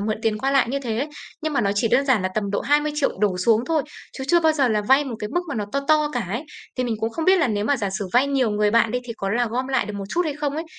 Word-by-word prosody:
mượn 215 Hz, +1 st, -1 dB
tiền 215 Hz, -1 st, 0 dB
qua 270 Hz, +5 st, 0 dB
lại 275 Hz, -3 st, +3 dB
như 275 Hz, +3 st, -1 dB
thế. 245 Hz, +2 st, -2 dB, 0.3 s
Nhưng 310 Hz, 0 st, -2 dB
mà 280 Hz, -, +1 dB
nó 200 Hz, -, +1 dB
chỉ 215 Hz, +3 st, +1 dB
đơn 275 Hz, -, +3 dB
giản 260 Hz, -8 st, +2 dB
là 185 Hz, -, 0 dB
tầm 200 Hz, -2 st, -1 dB
độ 200 Hz, -, -1 dB
20.000.000 295 Hz, -, 0 dB
đổ 195 Hz, -3 st, +1 dB
xuống 225 Hz, +5 st, +3 dB
thôi, 320 Hz, -3 st, +1 dB, 0.3 s
chứ 265 Hz, -, -6 dB
chưa 345 Hz, +3 st, +5 dB
bao 320 Hz, -1 st, +4 dB
giờ 280 Hz, -4 st, +2 dB
là 215 Hz, -2 st, +1 dB
vay 265 Hz, +7 st, +4 dB
một 250 Hz, -5 st, -5 dB
cái 210 Hz, -, -4 dB
mức 350 Hz, -, 0 dB
mà 285 Hz, -, -3 dB
nó 215 Hz, -2 st, -2 dB
to 280 Hz, -, 0 dB
to 305 Hz, -1 st, +4 dB
cả 245 Hz, -, -1 dB
ấy. 230 Hz, -, -3 dB, 0.3 s
Thì 255 Hz, -, 0 dB
mình 235 Hz, -2 st, -1 dB
cũng 225 Hz, -, -1 dB
không 320 Hz, +7 st, -3 dB
biết 375 Hz, +2 st, +5 dB
là 330 Hz, -, +2 dB
nếu 205 Hz, -2 st, -1 dB
mà 285 Hz, +5 st, +2 dB
giả 205 Hz, -5 st, -2 dB
sử 200 Hz, -3 st, -4 dB
vay 250 Hz, +3 st, +4 dB
nhiều 270 Hz, -5 st, +1 dB
người 210 Hz, 0 st, +1 dB
bạn 230 Hz, 0 st, +3 dB
đi 250 Hz, -, 0 dB
thì 235 Hz, -, -5 dB
có 195 Hz, -, -3 dB
là 240 Hz, +3 st, +1 dB
gom 245 Hz, +3 st, -2 dB
lại 265 Hz, -5 st, 0 dB
được 210 Hz, -, -6 dB
một 200 Hz, -1 st, -5 dB
chút 340 Hz, -, -1 dB
hay 305 Hz, -3 st, -2 dB
không 290 Hz, -1 st, -2 dB
ấy? 320 Hz, +2 st, -3 dB
245 Hz, 335 wpm, -22 LUFS, 215-285 Hz, 0.3 s, chưa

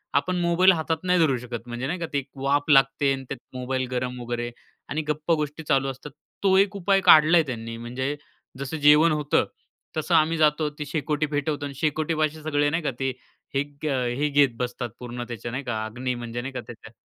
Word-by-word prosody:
आपण 180 Hz, +6 st, +1 dB
मोबाईल 175 Hz, +2 st, +5 dB
हातात 160 Hz, -1 st, -1 dB
नाही 180 Hz, -1 st, +3 dB
धरू 140 Hz, -6 st, +3 dB
शकत, 120 Hz, -1 st, -7 dB
म्हणजे 120 Hz, +2 st, -4 dB
नाही 175 Hz, +3 st, -3 dB
का 165 Hz, -, -2 dB
ते -, -, +2 dB
एक 140 Hz, -1 st, -3 dB
वाफ 140 Hz, +2 st, +1 dB
लागते 135 Hz, 0 st, +4 dB
आणि 135 Hz, 0 st, -5 dB
त्यात 135 Hz, -, -5 dB, 0.2 s
मोबाईल 130 Hz, 0 st, -2 dB
गरम 125 Hz, 0 st, -2 dB
वगैरे 120 Hz, 0 st, -3 dB, 0.4 s
आणि 155 Hz, -, -1 dB
गप्पागोष्टी 150 Hz, 0 st, -1 dB
चालू 135 Hz, -2 st, +2 dB
असतात 135 Hz, +2 st, -8 dB, 0.3 s
तो 190 Hz, -1 st, +4 dB
एक 200 Hz, +1 st, +3 dB
उपाय 195 Hz, 0 st, +2 dB
काढला 160 Hz, 0 st, +7 dB
आहे 160 Hz, -, +4 dB
त्यांनी, 115 Hz, -2 st, -5 dB
म्हणजे 125 Hz, +4 st, -3 dB, 0.4 s
जसं 140 Hz, +3 st, -4 dB
जेवण 150 Hz, +2 st, +6 dB
होतं, 150 Hz, -1 st, +1 dB, 0.5 s
तसं 160 Hz, +3 st, +1 dB
आम्ही 160 Hz, +1 st, +3 dB
जातो, 150 Hz, 0 st, +3 dB
ती 150 Hz, 0 st, -7 dB
शेकोटी 150 Hz, +1 st, -1 dB
पेटवतो 145 Hz, 0 st, -2 dB
आणि 140 Hz, -, -6 dB
शेकोटीपाशी 155 Hz, +1 st, 0 dB
सगळे 145 Hz, -1 st, +1 dB
नाही 165 Hz, +3 st, -1 dB
का, 145 Hz, -, 0 dB
ते 135 Hz, 0 st, 0 dB, 0.5 s
हे 135 Hz, -, +2 dB
ग 145 Hz, +1 st, -12 dB
अ, 130 Hz, -3 st, 0 dB
हे 150 Hz, +1 st, +1 dB
घेत 145 Hz, -1 st, +4 dB
बसतात 125 Hz, 0 st, -3 dB
पूर्ण 120 Hz, 0 st, -6 dB
त्याचा 120 Hz, 0 st, -6 dB
नाही 130 Hz, +3 st, -4 dB
का? 110 Hz, -4 st, -2 dB
अग्नी 125 Hz, +3 st, -3 dB
म्हणजे 120 Hz, 0 st, -5 dB
नाही 135 Hz, +2 st, -6 dB
का -, -, -4 dB
त्याच्या 110 Hz, -2 st, -11 dB
145 Hz, 210 wpm, -25 LUFS, 125-155 Hz, 0.5 s, काढला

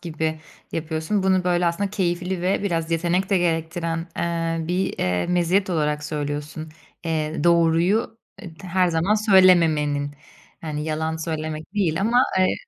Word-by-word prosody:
gibi 160 Hz, -1 st, -3 dB, 0.3 s
yapıyorsun. 160 Hz, +5 st, -2 dB
Bunu, 190 Hz, -1 st, +2 dB
böyle, 175 Hz, -1 st, +2 dB
aslında 190 Hz, +4 st, -1 dB
keyifli 180 Hz, -2 st, -2 dB
ve 190 Hz, +2 st, 0 dB
biraz 165 Hz, -4 st, -1 dB
yetenek 175 Hz, +3 st, 0 dB
de 195 Hz, -, +4 dB
gerektiren, 165 Hz, 0 st, -1 dB
eee, 165 Hz, -1 st, -2 dB
bir, 185 Hz, +2 st, -1 dB
eee, 90 Hz, -1 st, 0 dB
meziyet 180 Hz, +2 st, +1 dB
olarak 150 Hz, -3 st, 0 dB
söylüyorsun, 150 Hz, +1 st, -4 dB, 0.4 s
eee, 155 Hz, -2 st, -2 dB
doğruyu, 170 Hz, +7 st, +2 dB, 0.2 s
eee, 175 Hz, -4 st, -9 dB
her 185 Hz, 0 st, +1 dB
zaman 170 Hz, +5 st, +1 dB
söylememenin. 165 Hz, -9 st, +4 dB, 0.5 s
Yani, 150 Hz, -2 st, -4 dB
yalan 160 Hz, +1 st, -2 dB
söylemek 160 Hz, +1 st, -5 dB
değil 185 Hz, -5 st, +1 dB
ama, 235 Hz, +5 st, +3 dB, 0.2 s
eee 185 Hz, 0 st, +3 dB
170 Hz, 135 wpm, -23 LUFS, 160-185 Hz, 0.5 s, de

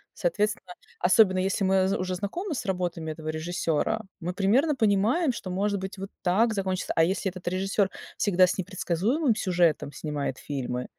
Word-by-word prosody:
Соответственно, 215 Hz, -, -1 dB, 0.3 s
особенно 185 Hz, 0 st, +5 dB
если 195 Hz, +2 st, 0 dB
мы 190 Hz, 0 st, +3 dB
зэ 195 Hz, -, 0 dB
уже 185 Hz, 0 st, -2 dB
знакомы 315 Hz, -, -3 dB
с 250 Hz, -, -4 dB
работами 175 Hz, -4 st, -2 dB
этого 155 Hz, 0 st, -7 dB
режиссёра, 165 Hz, +5 st, -1 dB, 0.2 s
мы 175 Hz, +2 st, -3 dB
примерно 245 Hz, -, +2 dB
понимаем, 225 Hz, -, +2 dB
что 195 Hz, -5 st, -6 dB
может 200 Hz, +2 st, 0 dB
быть 190 Hz, +1 st, -6 dB
вот 195 Hz, +1 st, -6 dB
так 220 Hz, +6 st, +3 dB
закончится. 190 Hz, -2 st, -2 dB
А 165 Hz, -, +6 dB
если 190 Hz, +1 st, -1 dB
этот 185 Hz, -1 st, -11 dB
режиссёр 195 Hz, +2 st, +1 dB, 0.3 s
всегда 185 Hz, -3 st, +3 dB
с 180 Hz, -, +3 dB
непредсказуемым 200 Hz, -, 0 dB
сюжетом 175 Hz, -8 st, +1 dB
снимает 145 Hz, -4 st, -3 dB
фильмы, 125 Hz, -3 st, -4 dB
190 Hz, 165 wpm, -27 LUFS, 175-210 Hz, 0.3 s, А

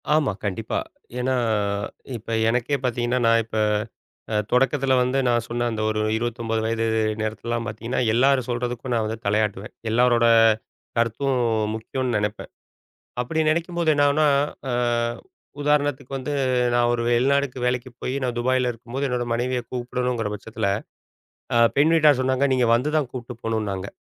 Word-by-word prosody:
ஆமா, 150 Hz, -6 st, +2 dB
கண்டிப்பா. 105 Hz, +2 st, -2 dB, 0.4 s
ஏன்னா, 130 Hz, +1 st, +1 dB, 0.8 s
இப்ப 115 Hz, +1 st, -9 dB, 0.2 s
எனக்கே 125 Hz, +4 st, +1 dB
பார்த்தீங்கன்னா, 120 Hz, 0 st, 0 dB
நான் 115 Hz, 0 st, +5 dB
இப்ப 110 Hz, -1 st, -5 dB, 0.8 s
அ -, -, +1 dB, 0.2 s
தொடக்கத்துல 135 Hz, +1 st, +2 dB
வந்து 125 Hz, +2 st, +1 dB
நான் 120 Hz, -1 st, +2 dB
சொன்ன 120 Hz, 0 st, -2 dB
அந்த 110 Hz, -1 st, -3 dB
ஒரு 110 Hz, 0 st, 0 dB, 0.2 s
29 115 Hz, -1 st, -2 dB
வயது 115 Hz, 0 st, 0 dB, 0.4 s
நேரத்துலெல்லாம் 115 Hz, +2 st, -3 dB
பார்த்தீங்கன்னா, 115 Hz, +3 st, -3 dB
எல்லாரும் 130 Hz, +1 st, +3 dB
சொல்றதுக்கும் 120 Hz, +1 st, -2 dB
நான் 115 Hz, -2 st, +1 dB
வந்து 110 Hz, +1 st, -3 dB
தலையாட்டுவேன். 105 Hz, 0 st, -1 dB, 0.2 s
எல்லோரோட 120 Hz, 0 st, +4 dB, 0.7 s
கருத்தும் 115 Hz, +4 st, +1 dB, 0.4 s
முக்கியம்னு 125 Hz, +2 st, -3 dB
நெனப்பேன். 105 Hz, +1 st, -3 dB, 0.7 s
அப்படி 140 Hz, +6 st, -1 dB
நினைக்கும்போது 170 Hz, 0 st, +1 dB
என்னாகும்னா 145 Hz, +1 st, +3 dB, 0.4 s
அ -, -, -1 dB, 0.9 s
உதாரணத்துக்கு 145 Hz, -2 st, 0 dB
வந்து, 135 Hz, +2 st, -4 dB, 0.4 s
நான் 120 Hz, 0 st, +3 dB
ஒரு 120 Hz, -1 st, 0 dB
வெளிநாட்டுக்கு 130 Hz, +1 st, +1 dB
வேலைக்கு 125 Hz, +1 st, -1 dB
போய், 130 Hz, -, -3 dB
நான் 125 Hz, -2 st, -2 dB
துபாயில 125 Hz, +1 st, +1 dB
இருக்கும்போது 125 Hz, +4 st, -4 dB
என்னோட 125 Hz, -1 st, -1 dB
மனைவிய 125 Hz, +1 st, -1 dB
கூப்பிடணுங்கிற 125 Hz, -2 st, -2 dB
பட்சத்துல, 110 Hz, +1 st, -4 dB, 0.9 s
அ -, -, +5 dB, 0.2 s
பெண் 155 Hz, +4 st, +5 dB
வீட்டார் 150 Hz, -4 st, +5 dB
சொன்னாங்க, 130 Hz, +2 st, +2 dB
நீங்க 125 Hz, -2 st, +2 dB
வந்து 125 Hz, +5 st, 0 dB
தான் 145 Hz, -5 st, 0 dB
கூப்ட்டு 125 Hz, -1 st, -6 dB
போகணும்னாங்க. 105 Hz, -4 st, -2 dB
120 Hz, 135 wpm, -23 LUFS, 115-130 Hz, 0.9 s, நான்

